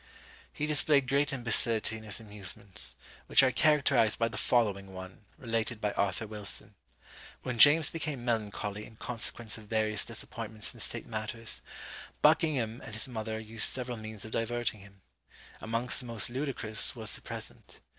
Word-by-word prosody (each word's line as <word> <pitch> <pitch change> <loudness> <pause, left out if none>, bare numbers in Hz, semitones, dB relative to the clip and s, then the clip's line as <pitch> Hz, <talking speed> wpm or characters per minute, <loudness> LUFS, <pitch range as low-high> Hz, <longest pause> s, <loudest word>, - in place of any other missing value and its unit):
'" - - -21
He 150 - -3
displayed 145 -2 +2
great 140 +3 +1
imbecility 115 -3 +2
in 110 - -9
his 105 0 -1
amusements, 100 -3 -3 0.3
which - - +6
are 130 - +4
characterised 135 -7 +3
by 115 0 +1
the 110 - -9
following 100 -4 0
one, 95 +3 -10
related 115 -1 -2
by 105 -1 -1
Arthur 100 +2 -1
Wilson: 105 -2 -2 0.7
When 120 -2 -4
James 150 +4 +8
became 150 -6 -4
melancholy 105 -3 -2
in 110 - -16
consequence 115 -1 -2
of 110 - -14
various 110 -1 +2
disappointments 110 -1 -4
in - - -15
state - - -1
matters, 110 +1 -2 0.6
Buckingham 150 -8 +2
and 110 - -8
his 110 - +3
mother 110 -2 -5
used 110 0 +2
several 125 -2 -2
means 110 -1 -7
of 110 - -9
diverting 115 -1 -2
him. 100 -1 -17 0.6
Amongst 115 +3 +4
the 125 - -5
most 115 0 -3
ludicrous 125 -6 +1
was 110 -3 -1
the - - -3
present. - - -8
115 Hz, 160 wpm, -30 LUFS, 110-125 Hz, 0.7 s, James